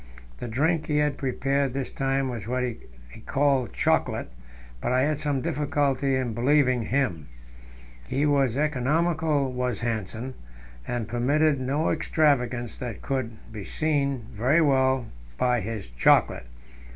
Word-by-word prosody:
The - - -5
drink 155 +7 0
he 150 - +1
had 150 -1 +1
prepared 135 0 0
this 135 -1 -3
time 135 0 0
was 115 -5 -5
what 125 +1 -1
he 120 -3 -3 0.5
called 135 -3 +2
chocolate, - - 0 0.5
but - - -1
I 130 0 +3
had 150 0 0
some 145 -3 -1
difficulty 140 -1 0
in 130 -3 -1
believing 130 +1 +3
him. 110 - -1 0.8
He 140 +3 0
was 140 -4 +2
economical, 150 0 +1
was 125 -1 -2
Hanssen, 115 +2 -3 0.5
and 120 -3 -2
permitted 140 +5 +2
no 140 +5 0
extravagance; 125 -6 +1
that 120 -5 -6
could 125 -5 -2 0.2
be 105 -3 -6
seen 140 -3 -1
very 125 +9 +2
well 130 -4 +3 0.3
by 125 -2 +2
his 105 -1 -5
chocolate. - - +3
130 Hz, 135 wpm, -26 LUFS, 120-145 Hz, 0.8 s, I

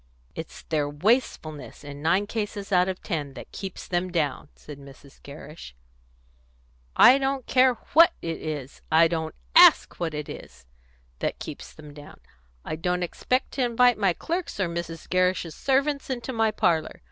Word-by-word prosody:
"It's - - -9
their 150 -2 -1
wastefulness, 155 - -1
in 145 0 -9
nine 175 +6 +2
cases 205 -2 -5
out 180 0 +3
of 185 - -6
ten, 145 -7 -4
that - - -10
keeps 190 -2 -7
them 180 0 -1
down," 150 -4 -2
said 145 -2 -11
Mrs. 140 0 -16
Gerrish. 145 - -11 1.2
"I 260 +3 +7
don't 270 -1 -1
care 255 -1 +4 0.2
what 335 +2 +7
it 165 -1 -5
is, 150 -4 -6
I 165 +1 +6
don't 160 -1 -3 0.2
ask - - +7
what 165 -3 -2
it 150 -1 -5
is, 65 0 -11 0.5
that - - -2
keeps - - -8
them 150 -2 -13
down. 145 0 -13 0.5
I 155 - -4
don't 180 +2 -1
expect 255 +9 -1
to 265 - -1
invite 245 -1 +3
my 195 -4 +3
clerks 340 - -4
or 190 - +1
Mrs. 170 -1 -6
Gerrish's 185 -2 0
servants 275 +1 0
into 260 0 -4
my 225 -1 +2
parlour. 165 -6 0
175 Hz, 160 wpm, -25 LUFS, 150-230 Hz, 1.2 s, I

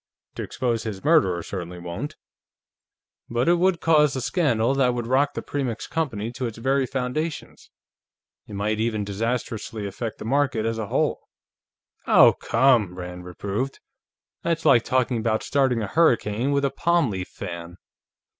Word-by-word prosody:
To - - -6
expose 120 -3 -2
his 105 -4 -6
murderer 95 - +3
certainly 90 -1 -6
won't. 90 - -6 1.1
But 120 +2 0
it 175 0 +4
would 185 -1 +2
cause 150 -3 +4
a 130 - -2
scandal 125 -5 +1
that 130 -3 +2
would 120 -1 -3
rock 135 +4 +2
the - - -4
Premix 130 -6 -3
Company 120 -9 -2
to 125 +1 -3
its 115 - -8
very 135 +2 +1
foundations. 135 +5 -4 0.8
It - - -10
might 105 +2 -1
even 110 -2 0
disastrously 110 +1 -3
affect 110 +3 -5
the - - -8
market 130 -3 +1
as 115 0 -1
a 110 - -3
whole." - - -1 0.8
"Oh, - - +7
come!" 115 -7 +3
Rand 90 0 -7
reproved. 100 +8 -4 0.6
"That's 165 -1 -1
like 115 - +6
talking 130 -1 +1
about 110 -1 0
starting 130 -5 +1
a - - -3
hurricane 120 - +2
with 140 0 +2
a 135 - 0
palm 170 -3 +1
leaf 95 -1 -4
fan." 85 -2 -8
120 Hz, 155 wpm, -24 LUFS, 105-140 Hz, 1.1 s, Oh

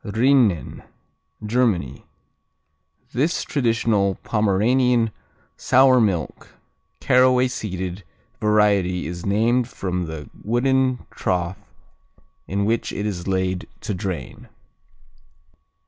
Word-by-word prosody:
Rinnen 110 - +1 0.6
Germany 105 - 0 1.1
This 150 +8 0
traditional 115 -7 +1
Pomeranian 115 +3 +2 0.5
sour 130 -1 +4
milk, 95 -8 -2 0.4
caraway 125 0 +4
seeded 95 -5 -5 0.4
variety 100 -4 +2
is 85 +3 -6
named 115 +4 +2
from 90 -6 -4
the 80 -3 -7 0.2
wooden 130 +2 +1
trough 90 0 -2 0.9
in 100 +1 -1
which 115 +2 -1
it 100 - -4
is 90 -4 -4
laid 95 -1 -1
to 105 - -3
drain. 95 -2 -6
105 Hz, 85 wpm, -22 LUFS, 95-125 Hz, 1.1 s, sour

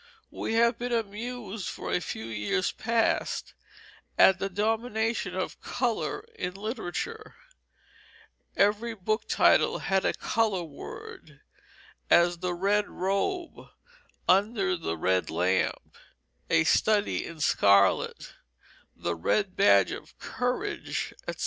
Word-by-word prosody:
We 225 - -3
have 235 +1 +3
been 245 0 -3
amused 225 -2 -4
for - - -5
a - - +2
few 110 -7 -5
years 110 - -1
past 230 0 0 0.6
at 190 -1 +6
the 195 - -2
domination 220 +3 -1
of - - -4
color 410 - -2
in 180 - -4
literature; 225 - -5 1.2
every 215 +3 +2
book 215 +3 -2
title - - +4
had 195 0 0
a - - +1
color 215 -5 0
word, 150 -4 -10 0.7
as 175 0 +4
The 180 0 -2
Red 205 +3 +1
Robe, 265 - -2 0.6
Under 195 0 +3
the 85 - -4
Red 90 +2 +1
Lamp, 90 +3 0 0.5
A 80 - +4
Study 210 - +2
in 165 -2 -9
Scarlet, 100 -9 +3 0.6
The 85 - -2
Red 185 - 0
Badge 100 -2 +5
of - - -9
Courage, 255 +12 -3
etc. - - -5
200 Hz, 115 wpm, -28 LUFS, 170-225 Hz, 1.2 s, at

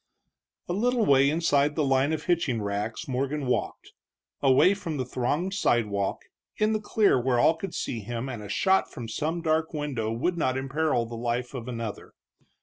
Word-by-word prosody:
A 175 - -2
little 235 +3 +1
way 140 0 +5
inside 150 -2 +2
the 155 - +1
line 135 +2 +2
of 160 -1 -2
hitching 155 -9 +1
racks 105 +2 -3
Morgan 135 +2 -2
walked, 125 - -2 0.5
away 135 +7 +5
from 170 -6 -5
the 130 - -2
thronged 145 +10 -1
sidewalk, 105 - 0 0.3
in 215 +1 +2
the 215 - -1
clear 205 - +3
where 125 0 +1
all 160 +7 +5
could 170 +2 -6
see 120 - -3
him 115 +4 -5
and 120 -5 -5
a 105 - -9
shot 190 - +2
from 120 - -7
some 160 +9 -2
dark 160 0 +1
window 135 -7 -2
would 170 +10 -1
not 130 -4 +1
imperil 135 -2 0
the 115 - -9
life 120 +2 -2
of 125 -3 -6
another. 115 -4 -6
135 Hz, 180 wpm, -27 LUFS, 120-160 Hz, 0.5 s, way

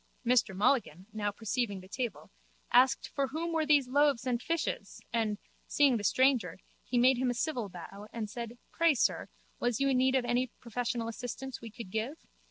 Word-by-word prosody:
Mr 235 -5 +3
Mulligan, 195 - +1
now 210 -1 -1
perceiving 215 0 -2
the 185 - -13
table, 240 +3 -4 0.4
asked 255 +2 +4
for 280 -1 0
whom 325 +5 -3
were 315 -2 +1
those 290 -4 +4
loaves 280 -2 +3
and 245 -1 0
fishes 335 -1 -2
and, 220 -3 0 0.3
seeing 280 -4 +4
the 205 - -5
stranger, 255 -6 +2 0.3
he 250 - -2
made 250 +1 +5
him 255 -1 +1
a 245 - -1
civil 245 -5 -2
bow 195 +3 -10
and 225 -2 -4
said, 235 +2 -6
Pray, 335 -3 +3
sir, - - +1 0.3
was 240 -2 0
you 275 0 +2
in 260 - +3
need 260 +1 +3
of 255 -2 +2
any 245 +1 +1
professional 235 0 -2
assistance 245 +3 -6
we 230 - -7
could 210 -3 -9
give? 225 +9 -2
245 Hz, 185 wpm, -31 LUFS, 220-265 Hz, 0.4 s, made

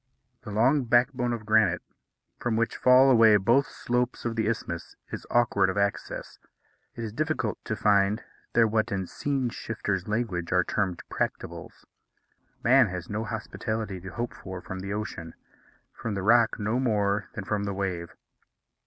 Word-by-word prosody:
The 125 - -9
long 125 +6 +3
backbone 125 +1 +2
of 115 -3 -4
granite, 110 -5 +3 0.6
from 120 -2 -1
which 115 0 0
fall 130 +1 +6
away 115 -3 +7
both 120 +8 +3
slopes 125 0 -2
of 115 -1 -1
the 110 -1 0
isthmus, 95 -7 -3 0.2
is - - -6
awkward 110 -5 +3
of 95 - -3
access. 100 0 -2 0.6
It 115 - -5
is 110 -2 -5
difficult 155 -5 -2
to 110 - -2
find 105 +1 +2 0.3
there 115 - +5
what, 110 0 0
in 95 -2 -1
scene 135 +5 -2
shifters' 105 -5 -3
language, 105 -6 -2
are 90 0 +4
termed 95 -2 -2
practicables. - - -4 0.8
Man 130 0 +6
has 90 -1 -6
no 110 +2 -2
hospitality 110 -2 -4
to 95 - -7
hope 120 +5 -4
for 95 -1 -8
from 95 +1 -7
the 100 +1 -5
ocean; 95 -6 -5 0.6
from 115 -3 -4
the 95 - -3
rock 115 +2 +4
no 110 +4 0
more 105 -4 +1
than 105 - -4
from 100 +1 -1
the 100 - -2
wave. 90 -3 -3
110 Hz, 160 wpm, -27 LUFS, 100-120 Hz, 0.8 s, away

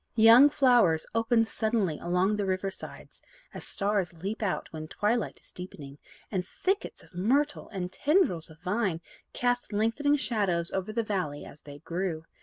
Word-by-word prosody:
Young 230 +5 +8
flowers 240 - +4
opened 225 0 +2
suddenly 215 -9 0
along 180 +4 +1
the 205 -1 -1
river 190 +1 -1
sides, - - -10 0.3
as - - -3
stars 200 -3 0
leap 195 +7 -5
out 205 -3 -1
when 155 0 -6
twilight 210 +5 -1
is - - -16
deepening, 145 -6 -10 0.3
and 185 -3 -1
thickets 385 - -3
of - - -21
myrtle, 270 +11 0
and 180 -3 -4
tendrils 290 - +2
of 160 0 -15
vine, 195 -3 -1 0.3
cast 245 -1 -1
lengthening 230 +8 +2
shadows 200 -11 -1
over 190 +2 -3
the 230 +1 -1
valley 185 -9 -3
as 145 - -13
they 145 -1 -11
grew. 165 +1 -4
200 Hz, 160 wpm, -28 LUFS, 175-230 Hz, 0.3 s, Young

